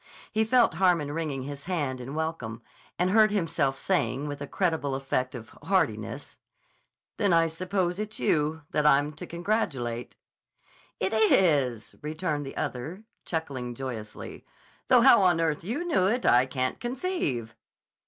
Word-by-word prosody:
He 220 +1 +2
felt 245 -4 +4
Harmon 170 -4 +2
wringing 150 -4 -3
his 140 +1 -7
hand 145 -8 -2
in 135 +4 -7
welcome 125 -8 -4 0.3
and 180 +1 +1
heard 215 +1 +6
himself 165 -9 0
saying 130 +5 0
with 145 -1 -6
a 145 - -4
creditable 160 -7 0
affect 130 -1 -2
of 115 -2 -9
heartiness: - - -1 0.8
"Then 200 -4 +2
I 165 0 +5
suppose 180 +2 -1
it's 215 +1 -4
you 155 -3 +1
that 150 - +1
I'm 145 0 +4
to 150 - -9
congratulate." 145 - -2 0.8
"It 190 +3 -1
is," 150 - +3
returned 150 -1 -3
the - - -8
other, 155 - -4 0.2
chuckling 135 -7 -4
joyously. 115 -5 -7 0.4
"Though 250 -2 +6
how 240 -4 +7
on 180 -3 +4
earth 160 -1 0
you 250 - -3
knew 245 - +2
it 245 +5 0
I 125 +2 +5
can't 130 -1 -2
conceive." 240 - -2
155 Hz, 145 wpm, -27 LUFS, 135-190 Hz, 0.8 s, how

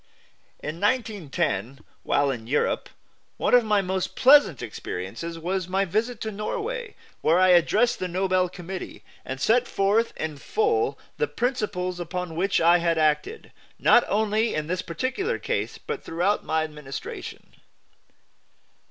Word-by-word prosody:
In 155 +3 -5
1910, 170 - -1 0.2
while 140 -1 +1
in 115 -4 -6
Europe, 145 +4 0 0.5
one - - 0
of 245 -1 +7
my 210 -2 +2
most 185 0 -2
pleasant 260 - +5
experiences 115 - -6
was 180 +2 -2
my 190 +2 +1
visit 220 +6 -1
to 220 - -3
Norway, 445 - -4 0.3
where 165 +2 +3
I 185 0 +5
addressed 210 +8 +4
the 185 - -2
Nobel 185 0 +1
Committee, 180 +1 -7 0.2
and 130 0 -6
set 235 - +3
forth 205 +4 +1
in 155 -2 -4
full 430 - 0 0.2
the 460 - +1
principles 205 -8 -2
upon 175 -1 -4
which 190 +4 +1
I 170 +1 +5
had 170 -1 +1
acted, 155 - 0 0.3
not 240 - +5
only 220 +2 +1
in 155 0 -1
this 180 +3 -2
particular 260 - -2
case - - -2
but 455 -2 -6
throughout 180 +5 0
my 160 0 0
administration. 150 -3 -8
185 Hz, 140 wpm, -25 LUFS, 165-225 Hz, 0.5 s, of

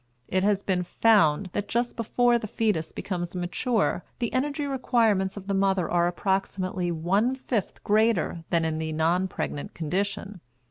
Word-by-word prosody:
It 185 - +1
has 200 0 +2
been 185 -2 0
found 180 -3 +3
that 205 - -2
just 240 +1 -1
before 240 +1 +2
the 215 - -5
fetus 200 -7 -1
becomes 175 -2 -4
mature 185 +3 0
the 235 -2 -2
energy 285 +3 0
requirements 225 -8 +1
of 195 - -7
the 200 - -2
mother 195 -3 +2
are 175 0 +2
approximately 185 -1 -1
one 195 +10 +1
fifth 245 -5 -3
greater 210 -6 +2
than 165 -1 +2
in 160 -1 -1
the 160 0 -3
non 170 +4 +1
pregnant 145 -5 -5
condition. 195 +3 -3
195 Hz, 155 wpm, -26 LUFS, 175-225 Hz, -, found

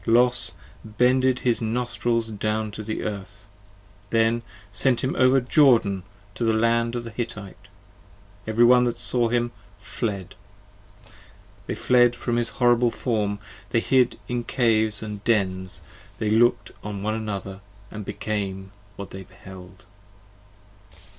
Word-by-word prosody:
Los 120 +2 +3 0.3
bended 125 +3 +2
his 120 -2 +1
Nostrils 115 0 -1
down 110 0 -2
to 110 - -7
the 110 0 -4
Earth, 100 0 -6 0.6
then 115 +1 +2 0.3
sent 120 +5 +2
him 130 - -1
over 130 +1 +5
Jordan 120 -7 +4 0.3
to 115 - -4
the 115 -1 +2
Land 115 +1 +1
of 120 - -3
the 115 - -8
Hittite; 110 -4 -7 0.8
every 115 +2 +4
one 125 +1 +6
that 120 -1 -1
saw 120 0 +1
him 120 0 0 0.3
Fled! 100 -6 -4 1.3
they - - -2
fled 120 -1 +4
at 120 -1 -2
his 120 -1 0
horrible 120 -1 +3
Form; 105 -4 -1 0.3
they 115 - +2
hid 125 +1 +2
in 120 -1 -2
caves 110 -4 +1
50 - - -5
And 105 -1 -7
dens, 95 -5 0 0.3
they 105 -1 -1
looked 110 -3 +3
on 100 -1 -5
one 110 +1 0
another 100 -3 -5 0.2
& 105 +1 -8
became 95 -2 -4 0.2
what 100 - -8
they 95 - -8
beheld. 95 0 -13
115 Hz, 135 wpm, -24 LUFS, 105-120 Hz, 1.3 s, one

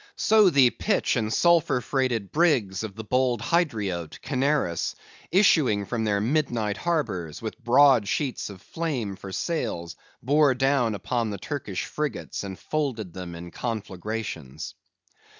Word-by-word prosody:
So 215 -3 +5
the 135 -6 +5
pitch 205 -7 0
and 110 -3 -1
sulphur 170 -3 +3
freighted 125 -6 -1
brigs 135 - +2
of 105 -3 -6
the 110 - -6
bold 125 +1 +1
Hydriote, 105 - -1
Canaris, 135 - 0 0.4
issuing 150 - +4
from 115 +1 -2
their 100 -1 +1
midnight 115 -4 0
harbors, 95 - -2
with 115 +3 -7
broad 125 -2 +5
sheets 135 0 -2
of 95 -3 -11
flame 130 -12 -3
for 95 0 -9
sails, 85 - -3 0.3
bore 145 +1 +4
down 130 -4 +2
upon 115 +3 -1
the 100 - -4
Turkish 105 - -4
frigates, 150 -7 -4
and 95 -2 -6
folded 125 - -3
them 90 -2 -7
in 85 +1 -9
conflagrations. 105 - -5
120 Hz, 135 wpm, -26 LUFS, 100-145 Hz, 0.4 s, So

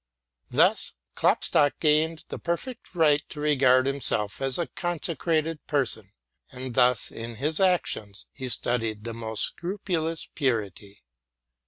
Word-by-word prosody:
Thus - - +2 0.2
Klopstock 145 -1 +2
gained 155 +1 +2
the - - -6
perfect 185 +5 -4
right 150 -3 +4
to 150 - -8
regard 130 -4 +4
himself 130 -7 -1
as 135 -1 0
a 170 - 0
consecrated 165 -2 -2
person, 115 -9 0 0.4
and 130 -1 -7
thus 125 -2 +3
in 115 +1 -7
his 150 +7 0
actions 175 - 0
he 130 -1 -6
studied 115 -3 +1
the 115 0 -5
most 110 -2 -2
scrupulous 170 -3 -3
purity. 105 - -2
140 Hz, 125 wpm, -26 LUFS, 115-160 Hz, 0.4 s, right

